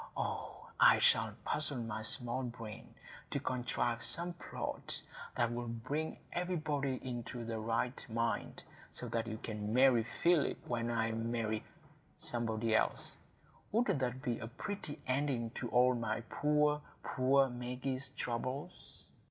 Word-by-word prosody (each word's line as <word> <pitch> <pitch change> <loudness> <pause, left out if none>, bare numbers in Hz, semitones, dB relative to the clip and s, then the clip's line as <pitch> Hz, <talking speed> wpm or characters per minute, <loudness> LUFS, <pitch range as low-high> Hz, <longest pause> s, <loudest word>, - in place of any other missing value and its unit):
Oh, - - -3
I - - +9
shall - - +4
puzzle 150 -3 -1
my 115 -2 -3
small 120 +3 -1
brain 115 -3 -7 0.3
to - - 0
contrive 120 -2 0
some 175 +1 +1
plot 175 - -4 0.4
that 120 -1 +2
will 120 0 -3
bring 130 +7 -2 0.2
everybody 155 -6 0
into 120 -1 -4
the 115 -1 -2
right 115 +3 0
mind, 115 -1 -1 0.3
so - - -6
that 115 0 0
you 110 -1 -3
may 110 - -2
marry 115 +3 +4 0.2
Philip 170 -2 +4
when 120 -1 0
I 115 -1 +1
marry—somebody 115 0 -2
else. - - +1 0.6
Wouldn't 225 - +3
that 130 0 -1
be 120 -2 0
a 110 - -4
pretty 150 - -5
ending 130 -3 +1
to 120 0 -4
all 125 +1 +5
my 115 -2 -1
poor, 150 0 +3 0.2
poor 135 +1 +4
Maggie's 125 +2 -3
troubles?" 130 +5 -4
120 Hz, 130 wpm, -35 LUFS, 115-135 Hz, 0.6 s, I